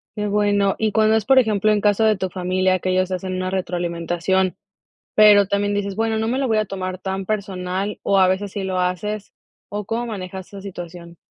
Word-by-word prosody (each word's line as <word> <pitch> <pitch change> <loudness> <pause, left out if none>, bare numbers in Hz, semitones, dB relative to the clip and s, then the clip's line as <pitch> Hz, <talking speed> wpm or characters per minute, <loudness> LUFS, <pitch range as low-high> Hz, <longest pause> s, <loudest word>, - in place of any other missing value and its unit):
Qué 210 0 -2
bueno, 205 -1 +2
y 220 -1 +1
cuando 220 0 +4
es, 215 -2 0
por 270 -1 +4
ejemplo, 215 -3 +3
en 210 - +2
caso 210 +1 +3
de 215 -2 +3
tu 190 -1 -2
familia 185 0 0
que 185 - -2
ellos 185 0 +1
hacen 185 0 -3
una 185 0 -2
retroalimentación, 175 +1 -1 0.6
pero 205 -2 +7
también 205 0 0
dices: 200 -1 -2
"Bueno, 225 0 0
no 220 0 -1
me 255 +3 0
lo 270 - 0
voy 220 -2 +2
a 215 - +2
tomar 185 -2 -5
tan 190 0 -4
personal", 195 -1 -3
¿o 195 - +3
a 185 - +5
veces 190 +1 -1
sí 200 - -4
lo 190 -1 -2
haces? 195 +3 -2 0.4
¿O 205 0 -4
cómo 235 +4 -2
manejas 190 -3 -6
esa 200 - -10
situación? 175 -3 -9
195 Hz, 210 wpm, -21 LUFS, 185-210 Hz, 0.6 s, pero